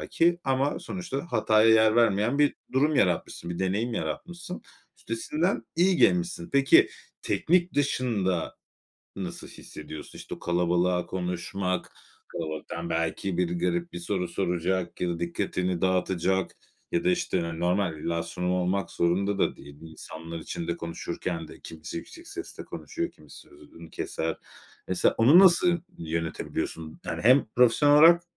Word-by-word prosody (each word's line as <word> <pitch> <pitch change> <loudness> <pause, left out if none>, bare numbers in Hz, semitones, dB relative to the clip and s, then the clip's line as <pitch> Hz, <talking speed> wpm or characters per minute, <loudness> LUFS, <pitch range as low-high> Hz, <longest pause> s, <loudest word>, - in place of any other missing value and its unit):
belki, 170 +1 +2
ama 135 +2 +1
sonuçta 175 -4 -5
hataya 110 +1 +4
yer 110 0 +5
vermeyen 115 +3 +3
bir 145 -1 +4 0.2
durum 145 +4 +3
yaratmışsın 90 -4 0
bir 85 - -4
deneyim 105 +6 -1
yaratmışsın. 175 +6 -5 0.4
Üstesinden 150 - -1
iyi 180 +1 +4
gelmişsin. 175 -1 +2
Peki, 135 0 +6 0.3
teknik 175 +1 +1
dışında 110 - 0 0.6
nasıl - - -6
hissediyorsun? 75 0 -10
İşte, - - -7
o - - -14
kalabalığa 90 0 +1
konuşmak, 90 +1 -3 0.4
kalabalıktan, 85 +1 -5
belki, 85 +3 -1
biri 90 -1 0
garip 85 -1 -1
bir 85 - -5
soru 90 0 -2
soracak 90 0 -1
ya 90 - 0
da 85 -1 -2
dikkatini 90 +1 -2
dağıtacak 95 0 +1 0.4
ya 170 0 0
da, 180 - +4
işte, 175 - 0
hani, 85 0 -4
normal 90 -2 +1
bir - - -11
illa 85 0 0
sorun 90 +2 -3
olmak 90 +2 0
zorunda 95 +4 +1
da - - +1
değil. 70 +1 -13
İnsanlar 80 +1 -9
içinde 85 +1 -4
konuşurken 85 0 -5
de - - -13
kimisi 80 - -8
yüksek 335 - -9
sesle 370 -2 -8
konuşuyor, 340 0 -5
kimisi - - -15
sözünü 330 -3 -15
keser. 380 +1 -3 0.5
Mesela 175 - +2
onu 135 +10 +7
nasıl 175 -2 +6 0.2
yönetebiliyorsun? 80 -1 -4
Yani, - - -4
hem 130 +5 +6
profesyonel 125 +4 +5
olarak 170 +3 +8
95 Hz, 140 wpm, -27 LUFS, -, 0.6 s, olarak